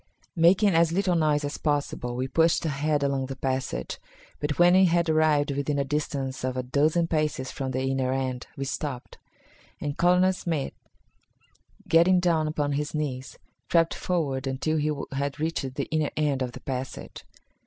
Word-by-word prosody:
Making 185 Hz, +5 st, +5 dB
as 165 Hz, 0 st, +4 dB
little 185 Hz, +1 st, +1 dB
noise 155 Hz, -3 st, +2 dB
as 145 Hz, -, -5 dB
possible, 145 Hz, -5 st, -1 dB
we 130 Hz, +1 st, -2 dB
pushed 165 Hz, +4 st, +2 dB
ahead 145 Hz, 0 st, 0 dB
along 135 Hz, -1 st, 0 dB
the 135 Hz, -, -5 dB
passage, 130 Hz, -, -3 dB, 0.4 s
but 145 Hz, 0 st, -2 dB
when 175 Hz, +1 st, +6 dB
we 190 Hz, +1 st, +6 dB
had 170 Hz, 0 st, +2 dB
arrived 155 Hz, -2 st, +3 dB
within 140 Hz, +1 st, -1 dB
a 140 Hz, -, +1 dB
distance 135 Hz, -2 st, -3 dB
of 130 Hz, 0 st, -2 dB
a 130 Hz, -, -1 dB
dozen 150 Hz, +6 st, +2 dB
paces 155 Hz, -5 st, -1 dB
from 135 Hz, -1 st, -4 dB
the 130 Hz, 0 st, -2 dB
inner 135 Hz, -1 st, 0 dB
end, 130 Hz, -1 st, -2 dB
we 135 Hz, -, -3 dB
stopped, 135 Hz, -2 st, -5 dB, 0.6 s
and 145 Hz, 0 st, -4 dB
Colonel 180 Hz, +2 st, +4 dB
Smith, 165 Hz, -6 st, -3 dB, 1.1 s
getting 175 Hz, +3 st, +5 dB
down 165 Hz, -3 st, +2 dB
upon 150 Hz, -2 st, -1 dB
his 145 Hz, +2 st, -2 dB
knees, 135 Hz, -4 st, -4 dB, 0.3 s
crept 165 Hz, -1 st, +3 dB
forward 140 Hz, -7 st, -2 dB
until 135 Hz, +4 st, -1 dB
he 155 Hz, 0 st, +1 dB, 0.2 s
had 140 Hz, +1 st, -2 dB
reached 150 Hz, -5 st, -2 dB
the -, -, -2 dB
inner 155 Hz, -2 st, +1 dB
end 145 Hz, -3 st, +1 dB
of 125 Hz, -1 st, -2 dB
the -, -, -10 dB
passage. 130 Hz, -1 st, -6 dB
145 Hz, 170 wpm, -26 LUFS, 135-165 Hz, 1.1 s, when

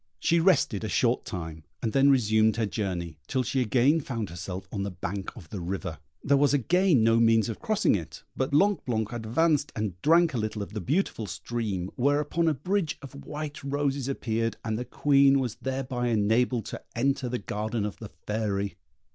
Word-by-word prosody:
She 170 Hz, -, +3 dB
rested 160 Hz, -, +3 dB
a 110 Hz, -, -2 dB
short 120 Hz, +4 st, +1 dB
time, 80 Hz, -6 st, -6 dB, 0.2 s
and 110 Hz, -, -2 dB
then 140 Hz, +1 st, +5 dB
resumed 110 Hz, -4 st, +4 dB
her 115 Hz, -1 st, 0 dB
journey, 90 Hz, -7 st, -3 dB
till 130 Hz, -, 0 dB
she 130 Hz, +2 st, 0 dB
again 130 Hz, +7 st, +3 dB
found 115 Hz, -, -4 dB
herself 90 Hz, +2 st, -6 dB
on 100 Hz, -, -3 dB
the 100 Hz, -, -2 dB
bank 95 Hz, +2 st, -5 dB
of 85 Hz, -8 st, -12 dB
the 100 Hz, -, -4 dB
river. 90 Hz, -1 st, -4 dB, 0.2 s
There 140 Hz, +1 st, +4 dB
was 145 Hz, +1 st, +4 dB
again 170 Hz, -, +3 dB
no 115 Hz, 0 st, +4 dB
means 115 Hz, -1 st, +4 dB
of -, -, -5 dB
crossing 220 Hz, -3 st, +2 dB
it; 85 Hz, -6 st, -4 dB
but 130 Hz, 0 st, -1 dB
Blanc 195 Hz, +7 st, +3 dB
blanc 110 Hz, -3 st, -1 dB
advanced 145 Hz, +7 st, +1 dB
and 100 Hz, -5 st, -3 dB
drank 165 Hz, 0 st, +4 dB
a 120 Hz, -, -1 dB
little 110 Hz, -1 st, -2 dB
of 100 Hz, -, -10 dB
the 105 Hz, -, -3 dB
beautiful 135 Hz, -, -1 dB
stream, 100 Hz, -2 st, -3 dB
whereupon 145 Hz, +5 st, +1 dB
a 155 Hz, -, +2 dB
bridge 165 Hz, +2 st, -1 dB
of 140 Hz, -, -9 dB
white 150 Hz, -1 st, -6 dB
roses 140 Hz, -1 st, -1 dB
appeared, 115 Hz, -4 st, -1 dB
and 110 Hz, -1 st, -1 dB
the 125 Hz, +3 st, -3 dB
Queen 140 Hz, +1 st, +4 dB
was 120 Hz, -4 st, -3 dB
thereby 130 Hz, -2 st, -2 dB
enabled 115 Hz, +1 st, +2 dB
to -, -, -6 dB
enter 130 Hz, +1 st, 0 dB
the 125 Hz, -, -1 dB
garden 105 Hz, +1 st, -3 dB
of 105 Hz, -4 st, -5 dB
the -, -, -9 dB, 0.2 s
Fairy. 100 Hz, -4 st, -2 dB
120 Hz, 190 wpm, -27 LUFS, 105-140 Hz, 0.2 s, then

